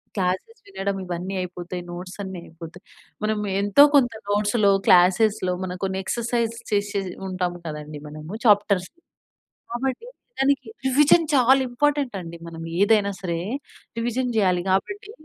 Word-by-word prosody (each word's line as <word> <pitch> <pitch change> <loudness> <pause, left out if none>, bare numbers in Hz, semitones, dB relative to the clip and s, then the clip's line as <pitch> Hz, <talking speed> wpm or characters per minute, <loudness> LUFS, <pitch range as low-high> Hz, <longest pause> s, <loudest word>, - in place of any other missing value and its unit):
Classes 190 - -2
వినడం 200 - -3
ఇవన్నీ 180 +1 -4
అయిపోతాయి, 180 0 -6
నోట్స్ 180 +1 -7
అన్ని 190 -2 -6
అయిపోతాయి. 165 +2 -12 0.4
మనం 215 0 0 0.2
ఎంతో 205 +8 +6
కొంత 245 -4 +4 0.2
నోట్స్‌లో 205 +1 +2 0.2
క్లాసేస్‌లో 185 +2 +4
మనం 180 -1 -4
కొన్ని 190 0 -1
ఎక్సర్సైజ్ 235 +1 -1 0.2
చేసి 205 0 +1
చేసి 195 -2 -2 0.2
ఉంటాం 185 -1 -2
కదండీ 150 -1 -6
మనము 155 +5 -8
చాప్టర్సూ. 205 - +3 0.8
కాబట్టి 260 - -3 0.3
దానికి 270 -2 +2 0.2
రివిజన్ 295 +5 +5
చాలా 265 0 +5
ఇంపార్టెంట్ 280 0 0
అండి. 170 -1 -8
మనం 165 -1 -8 0.2
ఏదైనా 205 -1 +4
సరే 170 -3 -2 0.6
రివిజన్ 240 +2 -1
చేయాలి. 185 -4 +2
కాబట్టి 390 - -1
200 Hz, 130 wpm, -23 LUFS, 180-240 Hz, 0.8 s, ఎంతో